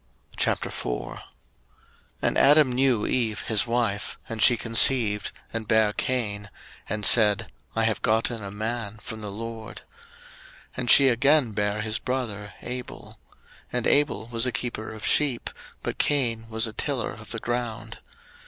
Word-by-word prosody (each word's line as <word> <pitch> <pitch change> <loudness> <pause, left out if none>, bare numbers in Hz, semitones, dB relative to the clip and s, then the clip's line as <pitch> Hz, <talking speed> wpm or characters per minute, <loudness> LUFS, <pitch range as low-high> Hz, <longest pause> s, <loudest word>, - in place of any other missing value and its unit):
01:004:001 - - -2 1.0
And - - +1
Adam 145 -1 +5
knew 125 -3 +1
Eve 115 -4 -1
his 110 +1 0
wife; 115 -4 -1
and 115 -1 -5
she 120 0 +6
conceived, 115 -2 +3 0.2
and 115 -2 -4
bare 110 -1 +3
Cain, 105 -6 -2 0.4
and 105 -1 -2
said, 105 -4 +5 0.2
I 115 - +1
have 110 -2 0
gotten 110 0 0
a 100 - -6
man 110 +1 -4
from 110 0 -8
the 105 - -5
LORD. 110 +1 -7 0.9
01:004:002 - - -23
And 125 -1 -3
she 140 +4 +8
again 135 +1 +3
bare 105 0 -1
his 110 0 -1
brother 110 -6 -4
Abel. 125 0 -7 0.5
And 125 -1 -2
Abel 145 -7 +2
was 115 +1 +2
a - - 0
keeper 115 -2 -4
of 110 -1 -8
sheep, 140 -5 +1 0.3
but - - -4
Cain 115 -6 0
was 110 +1 0
a 110 - -5
tiller 135 -1 -2
of 110 -2 -13
the 115 - -4
ground. 120 -1 -4
115 Hz, 150 wpm, -25 LUFS, 105-125 Hz, 1.0 s, she